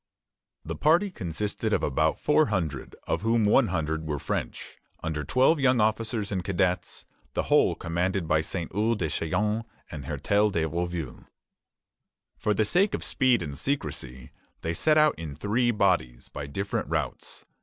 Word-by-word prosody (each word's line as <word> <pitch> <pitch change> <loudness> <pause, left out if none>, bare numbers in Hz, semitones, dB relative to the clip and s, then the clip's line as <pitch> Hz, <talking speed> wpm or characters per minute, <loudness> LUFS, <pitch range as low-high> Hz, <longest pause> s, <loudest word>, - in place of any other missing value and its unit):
The - - -4
party 170 +6 +3
consisted 100 - -3
of - - +1
about - - +1
four 150 +1 +3
hundred, 80 - -3
of - - -1
whom 115 +1 +2
one 110 +4 +4
hundred 80 -2 -2
were 75 -1 -1
French, - - -4 0.2
under 80 -2 -2
twelve 130 - +3
young 130 -2 +3
officers 110 -1 0
and 95 -2 -1
cadets; 90 -1 -1 0.3
the - - +1
whole - - +3
commanded 90 +1 -1
by 75 0 +3
Saint 85 +1 -4
Ours 110 +4 +1
des 80 -6 -1
Chaillons 105 +9 0 0.3
and 70 -4 -7
Hertel 105 +1 +1
de 85 -5 0
Rouville. 85 -4 -4 1.1
For 105 -1 0
the 110 - +2
sake 195 - +2
of - - -5
speed 130 -8 +2
and 75 -3 -6
secrecy, 65 - -3 0.3
they 80 - -2
set 155 - +3
out 155 -1 +5
in 80 -4 -6
three 110 - +1
bodies, 90 - +1
by 70 - -6
different 100 +8 -3
routes. - - -3
95 Hz, 160 wpm, -27 LUFS, 80-115 Hz, 1.1 s, out